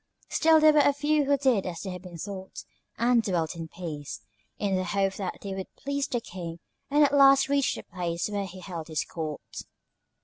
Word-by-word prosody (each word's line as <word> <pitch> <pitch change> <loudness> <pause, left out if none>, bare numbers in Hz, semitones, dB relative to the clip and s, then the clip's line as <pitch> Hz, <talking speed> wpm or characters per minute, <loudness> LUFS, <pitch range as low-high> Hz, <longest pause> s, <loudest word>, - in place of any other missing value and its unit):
Still 320 0 +5
there 310 0 +7
were 300 - +5
a 285 0 +5
few 295 +1 +1
who 285 +1 +3
did 255 -9 +2
as 170 -2 -5
they 190 - -5
had 180 -1 -7
been 180 -2 -10
taught, 190 +2 -7 0.3
and 235 0 +4
dwelt 175 -6 -1
in 165 -1 -6
peace, 155 - -7 0.4
in 200 -2 0
the 185 - 0
hope 195 +1 0
that 190 -3 -4
they 200 -1 -4
would 190 -1 -6
please 280 0 -2
the 240 - -1
King 175 -6 -7 0.3
and 295 +1 +5
at 285 - +3
last 275 -1 +6
reach 280 -1 +2
the - - -7
place 175 -2 -3
where 205 -1 -2
he 185 0 -10
held 170 -3 -6
his 155 -2 -1
court. 155 -3 -6
195 Hz, 210 wpm, -27 LUFS, 175-275 Hz, 0.4 s, there